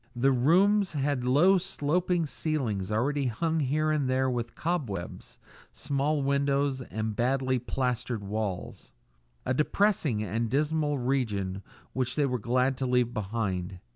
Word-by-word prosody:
The 135 +3 +3
rooms 185 +10 +3
had 140 -3 -1
low 170 +10 +5
sloping 175 0 0
ceilings 120 - -2
already 135 +5 0
hung 160 +8 -1
here 155 +2 +1
and 145 -4 0
there 130 0 +1
with 120 -1 -3
cobwebs, 130 - -4 0.3
small 145 +1 -1
windows, 140 -1 +1
and 110 -3 -4
badly 130 +2 +1
plastered 125 -3 -2
walls 100 -2 -4 0.5
a 130 - +1
depressing 150 - +1
and 110 +3 -2
dismal 150 +2 +1
region 110 -7 -1 0.3
which 130 -1 -1
they 150 - +2
were 125 -2 -1
glad 125 +4 +1
to 130 - -1
leave 125 -1 +1
behind. 95 -4 -3
130 Hz, 135 wpm, -28 LUFS, 115-150 Hz, 0.5 s, low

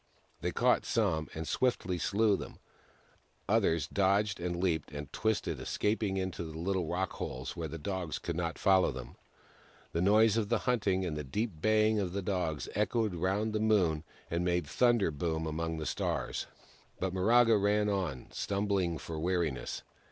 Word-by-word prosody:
They - - -1
caught - - +3
some, 85 -9 0
and 80 0 -4
swiftly 100 -8 0
slew 105 +2 +3
them; - - -7 0.9
others 95 -6 +2
dodged, 100 +1 +2
and 85 0 -2
leaped, 85 -5 0
and 75 -2 -7
twisted, 110 -1 0
escaping 105 -2 0
into 95 -2 -3
little 85 +2 -2
rockholes, 85 -7 -3
where 85 -2 -3
the 80 +2 -6
dogs 90 0 -3
could 85 - -4
not 85 -1 -2
follow 95 -4 +4
them. 65 -2 -8 0.8
The 85 - -1
noise 105 +3 +5
of 105 -2 0
the - - +3
hunting 100 -7 +1
and 80 -4 -2
the 75 - -3
deep 105 - -2
baying 110 +1 +3
of 90 -3 -2
the 100 0 -2
Dogs 90 -6 -1
echoed 105 0 +1
round 95 +5 0
the 110 - 0
Moon 95 -8 +2 0.3
and 85 +1 0
made 90 -1 +1
thunder 120 -8 +3
boom 80 +2 -2
among 80 +1 -2
the 80 - -4
Stars. - - -2 0.5
But 95 -1 -1
Miraga 115 +5 +5
ran 105 +1 +2
on, 90 -11 -1
stumbling 100 -4 0
for 80 +1 -6
weariness. 85 -7 -1
95 Hz, 160 wpm, -32 LUFS, 80-105 Hz, 0.9 s, noise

